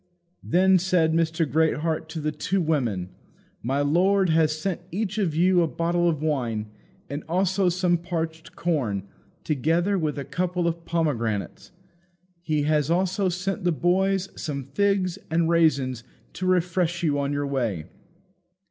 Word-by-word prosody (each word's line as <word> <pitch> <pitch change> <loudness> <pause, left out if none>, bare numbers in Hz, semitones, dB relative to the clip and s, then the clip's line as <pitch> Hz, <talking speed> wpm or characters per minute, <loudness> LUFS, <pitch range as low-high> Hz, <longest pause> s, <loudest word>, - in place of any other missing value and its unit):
Then 185 +2 +4
said 170 -3 +2
Mr. 165 0 +1
Greatheart 160 +1 0
to 160 - -5
the 155 0 -1
two 185 +6 -1
women, 125 - 0 0.5
"My 135 +4 0
lord 185 +6 +3
has 160 -1 +2
sent 180 +2 -3
each 210 +3 -2
of 175 -7 0
you 180 +2 +4
a 165 - +2
bottle 170 +1 +1
of 155 -2 -2
wine, 115 -8 -1 0.4
and 145 +2 -5
also 185 +1 +2
some 175 -1 +1
parched 165 -2 -4
corn, 125 - -1 0.4
together 165 +7 +1
with 155 -3 -2
a 140 - -4
couple 180 +1 -1
of 170 0 -3
pomegranates. 120 -11 -2 0.7
He 155 -3 0
has 150 -1 +1
also 185 +2 +1
sent 185 +3 -3
the 175 - +2
boys 190 +4 +1
some 140 -3 -4
figs 185 +6 0
and 165 +1 +2
raisins 140 -8 +2 0.3
to 185 - -3
refresh 175 -1 +1
you 145 -3 +1
on 140 0 -1
your 145 0 -1
way." 120 - -2
165 Hz, 150 wpm, -25 LUFS, 150-180 Hz, 0.7 s, Then